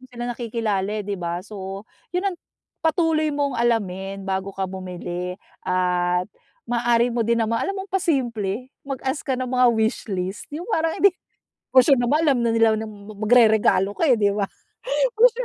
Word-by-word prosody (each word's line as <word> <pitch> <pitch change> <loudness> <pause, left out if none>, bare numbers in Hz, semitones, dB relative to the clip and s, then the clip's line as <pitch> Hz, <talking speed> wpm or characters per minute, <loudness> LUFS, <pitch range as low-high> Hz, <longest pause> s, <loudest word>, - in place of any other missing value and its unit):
mo 255 - -14
sila 240 0 -5
nakikilala, 215 -4 -2
eh, 205 - -6
'di 205 0 -3
ba. 170 +1 -2
So, 195 -1 -7 0.3
'yon 395 +2 +1
ang, - - -10 0.5
patuloy 320 -1 +2
mong 285 -3 -1
alamin 195 -4 -1
bago 190 0 -2
ka 190 - -1
bumili 180 -1 -5 0.3
at 180 -1 +1 0.4
maaari 240 0 +2
mo 240 - -1
din 235 0 +2
naman 230 +1 0
alam - - -1
mo 385 - -4
ang - - -65
pa 385 - +2
simple? 240 - -1 0.2
Mag 275 -2 -3
ask 265 +2 -1
ka 265 -4 0
ng 255 0 -3
mga 255 0 +4
wishlist, 200 -3 -2
'yong 335 +8 -6
parang 325 0 +1
hindi 400 -2 +6 0.6
for 255 -1 +7
sure 275 -2 +5
naman 290 +7 +2
alam 280 -5 +3
na 235 - +2
nila 225 -1 +5
na 220 0 -4
magreregalo 215 -1 +3
ka, 325 - 0
eh, 250 - +5
'di 205 -2 +2
ba, 200 -1 -1 0.7
for 460 +3 +7
sure - - -4
225 Hz, 185 wpm, -23 LUFS, 195-265 Hz, 0.7 s, for